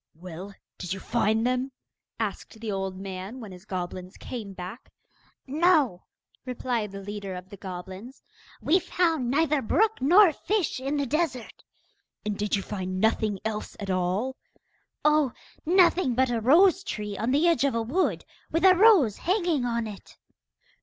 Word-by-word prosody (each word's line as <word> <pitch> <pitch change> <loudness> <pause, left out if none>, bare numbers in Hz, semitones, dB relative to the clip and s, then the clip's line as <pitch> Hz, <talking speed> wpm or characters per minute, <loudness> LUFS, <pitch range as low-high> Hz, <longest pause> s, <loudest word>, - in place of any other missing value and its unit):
'Well, 185 +3 -9 0.2
did 180 0 -3
you 195 - -6
find 225 +1 +1
them?' 255 +2 0 0.5
asked 220 - -4
the 220 -1 -4
old 195 -1 -3
man 195 +5 -6
when 215 -5 -9
his 180 +2 -12
goblins 185 -1 -5
came 225 -6 -7
back. 190 +5 -9 0.5
'No,' 295 - +2 0.4
replied 245 -4 -2
the 195 0 -8
leader 200 -1 -6
of 180 +1 -9
the 200 - -10
goblins, 190 +6 -8 0.4
'we 360 +4 +4
found 330 -7 0
neither 300 +1 +2
brook 425 - +1
nor 350 +5 +6
fish 395 -4 -1
in 275 +3 -2
the 285 - 0
desert.' 275 -4 -2 0.6
'And 210 -1 -1
did 210 +1 0
you 195 - -2
find 185 -2 -4
nothing 215 -1 +1
else 215 -1 -4
at 200 -2 -3
all?' 185 +8 -1 0.7
'Oh, 300 -4 +3 0.3
nothing 355 -6 +4
but 260 0 +2
a 230 -2 -1
rose 355 - +5
tree 210 - -4
on 225 +4 -2
the 290 +6 +3
edge 335 -4 +3
of 280 -4 +1
a 230 - +1
wood, 315 +12 0 0.2
with 330 +4 +1
a 375 - +9
rose 365 - +5
hanging 345 - 0
on 235 -1 -1
it. 210 -3 -10
235 Hz, 160 wpm, -26 LUFS, 195-300 Hz, 0.7 s, a